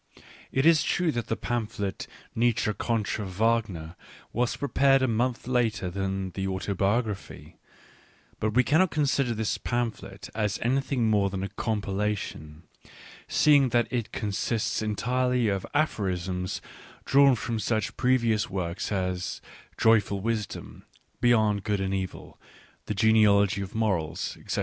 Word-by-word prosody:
It 135 +2 +1
is 165 -2 +6
true 175 -2 +1
that 120 -4 -3
the 110 - 0
pamphlet 105 -5 -3 0.3
Nietzsche 115 -2 +1
contra 110 -2 -1
Wagner 95 -4 -1 0.4
was 120 +1 0
prepared 135 -1 +3
a - - +3
month 120 +2 0
later 115 -7 0
than 95 0 -3
the 95 +1 -3
Auto 95 +1 -2
biography; 105 +2 -2 0.8
but 110 0 -1
we 125 - +5
cannot 170 +7 +3
consider 140 -5 +1
this 110 -1 -1
pamphlet 120 -2 -3
as 105 -2 -1
anything 130 -1 +1
more 105 -2 +3
than 95 -1 -4
a 100 - -3
compilation, 100 -7 -3 0.6
seeing 145 -3 +4
that 120 +2 +1
it 120 -3 -2
con 105 - -3
sists 110 +3 -1
entirely 125 +2 +1
of 100 -2 -2
aphorisms 95 - -1 0.4
drawn 140 -1 +5
from 115 0 -3
such 110 0 -1
previous 120 -4 +2
works 90 -1 -3
as 90 -2 -2 0.4
Joyful 105 -3 +3
Wisdom, 110 0 -4 0.4
Beyond 110 -4 +3
Good 105 -2 0
and 95 0 -1
Evil, 95 -1 -5 0.5
The 105 - -2
Genealogy 105 -2 +4
of 100 +1 -7
Morals, 95 -6 -1
etc. - - -3
110 Hz, 135 wpm, -27 LUFS, 95-120 Hz, 0.8 s, is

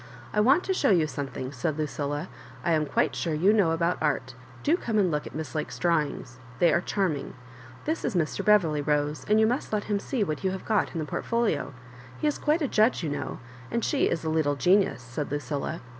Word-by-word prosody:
" 120 - -18
I - - +1
want 270 +11 +5
to 380 - 0
show 290 -7 +2
you 175 -6 +4
something,^ 140 -2 -5
said 145 +4 -2
Lucilla. 145 +1 -2 0.4
I 170 - +2
am 155 -2 +2
quite - - +1
sure 165 -3 -1
you 185 +7 +4
know 200 -6 +4
about 170 +2 0
art 145 -4 0 0.3
Do 310 - +4
come 230 - -2
and 190 -4 +3
look 150 -1 -2
at - - -10
Miss 155 -3 -5
Lake's 155 - -3
drawings; 150 -7 -1 0.2
they 170 +1 +4
are 170 - +3
charming. 175 -8 -2 0.5
This 315 +2 -1
is 235 - -1
Mr. 160 -3 0
Beverley, 175 -9 +4
Rose, 145 -1 0
and 215 +1 +5
you 220 - +5
must 245 +5 -1
let 210 -1 0
him 205 -1 -1
see 240 +1 -1
what 155 -4 -3
you 190 - +2
have 190 0 -5
got 220 - +1
in - - -1
the 155 - -2
port 145 - -4
folia 230 -13 0 0.5
He - - -3
is 295 - +1
quite 310 +2 +1
a - - +1
judge, 220 -3 +2
you 155 - -1
know; 145 - -4 0.3
and 235 -1 -1
she 285 - +2
is 165 - -2
a 160 - -1
little 155 -3 +1
genius," 185 -2 +2
said 125 +4 -4
Lucilla. 145 +2 -3
165 Hz, 235 wpm, -27 LUFS, 150-210 Hz, 0.5 s, want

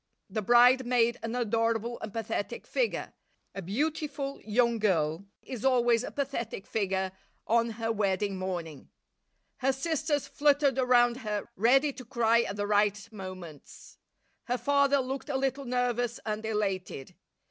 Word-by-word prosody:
The 215 +2 -1
bride 245 +4 +6
made 240 -1 +2
an 230 +1 -4
adorable 230 0 0
and 215 - -5
pathetic 220 -2 -4
figure; - - -1 0.4
a 195 - -5
beautiful 280 - -3
young 235 +1 +2
girl 170 -4 +1 0.2
is 250 -5 -7
always 240 -3 +3
a - - -4
pathetic 240 -7 -4
figure 190 -3 -1 0.3
on 230 +1 +2
her 225 -1 -1
wedding 200 -2 0
morning. 175 -6 -5 0.7
Her 270 0 +2
sisters 295 +1 -1
fluttered 285 -2 +2
around 245 -1 +4
her, 210 -5 -3
ready 270 +7 +3
to 255 - -10
cry 235 0 +2
at 200 - -4
the 205 0 -2
right 205 0 +1
moments. 185 -7 -10 0.5
Her 245 0 -1
father 280 +3 +3
looked 265 +3 -5
a 275 - 0
little 270 +1 -1
nervous 245 -1 -1
and 215 0 -3
elated. 195 -10 -3
235 Hz, 140 wpm, -29 LUFS, 205-260 Hz, 0.7 s, bride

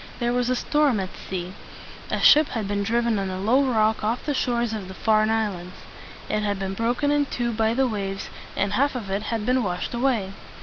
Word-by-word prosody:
There 240 -1 0
was 245 0 0
a 255 - +2
storm 290 -3 +2
at 185 -1 -5
sea. 180 -1 -4 0.6
A - - -1
ship 305 0 +7
had 215 -3 -2
been 205 0 -1
driven 230 +1 +1
on 195 -1 -2
a 185 0 -4
low 230 +8 +3
rock 220 -5 +1
off 225 +3 -1
the 295 - 0
shores 240 -3 0
of 205 -4 -5
the 190 - -9
Farne 215 +1 +2
Islands. 200 -5 -2 0.5
It 215 - 0
had 205 -1 -1
been 195 0 -3
broken 240 +7 0
in 290 -1 +2
two 240 -2 -2
by 220 0 +1
the 265 0 +2
waves, 195 -4 -4 0.3
and 200 +1 0
half 280 +5 +2
of 210 -6 -5
it 195 +2 0
had 225 -2 -2
been 255 +1 +2
washed 180 +1 -3
away. 235 -6 0
220 Hz, 220 wpm, -24 LUFS, 195-245 Hz, 0.6 s, ship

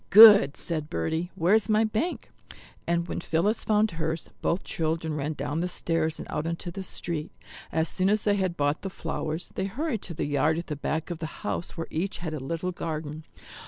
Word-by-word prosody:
"Good," 205 -8 +10
said 155 -3 -3
Bertie, 160 - -1
"where's 195 +5 +3
my 215 +1 +4
bank?" 225 +11 -2 0.6
And 170 0 +1
when - - -3
Phillis 175 +6 +1
found 215 0 +3
hers, 160 0 -3
both 170 - 0
children 160 -1 -1
ran 150 +1 -2
down 145 +2 -3
the 175 - 0
stairs 165 -2 0
and - - -7
out 150 +1 -2
into 170 +1 -3
the 195 - -5
street. 170 -4 -4 0.4
As 160 0 +1
soon 185 +1 +1
as 210 0 +2
they 205 - +3
had 185 -3 -1
bought 145 +1 +1
the 195 - -4
flowers 160 -2 -4
they 190 - -1
hurried 240 +2 -2
to 170 - -6
the - - -1
yard 150 +2 +2
at 170 - -3
the 150 - -4
back 155 +4 -2
of 170 - -4
the 160 - -3 0.2
house 175 - -3
where 165 - -2
each 185 +5 -2
had 165 -3 -4
a 155 - -3
little 165 +7 -3
garden. 155 -2 -5
165 Hz, 205 wpm, -27 LUFS, 155-190 Hz, 0.6 s, Good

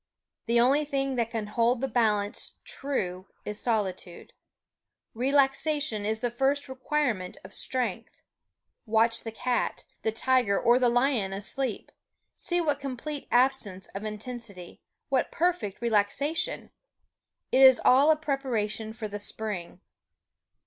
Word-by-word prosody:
The 235 +1 +3
only 270 +5 +4
thing 275 -2 -1
that 230 -1 0
can 225 -2 -3
hold 235 +3 +1
the 270 - -1
balance 210 -5 0
true 185 -10 -3 0.2
is 210 0 -4
solitude. 190 -6 -3 0.8
Relaxation 270 -2 +1
is 220 0 -1
the 245 - -1
first 270 +4 0
requirement 260 -7 -2
of 185 +2 -11
strength. 235 -3 -2 0.6
Watch 225 +1 +2
the 225 - -5
cat, 245 +2 -2 0.2
the 220 - 0
tiger 240 -3 +2
or 240 +2 +4
the 250 -1 +4
lion 240 -5 +1
asleep. 220 +4 -2 0.4
See 350 0 0
what 295 -4 0
complete 280 +2 -5
absence 240 -7 +1
of 195 - -7
intensity 215 -4 -7 0.3
what 265 -2 +1
perfect 335 - -1
relaxation! 235 +9 0 0.8
It 265 - +4
is 260 -2 +8
all 270 +4 +6
a 315 - +6
preparation 240 -8 -2
for 220 -1 -5
the 205 0 -6
spring. 205 -4 -4
240 Hz, 130 wpm, -28 LUFS, 210-270 Hz, 0.8 s, is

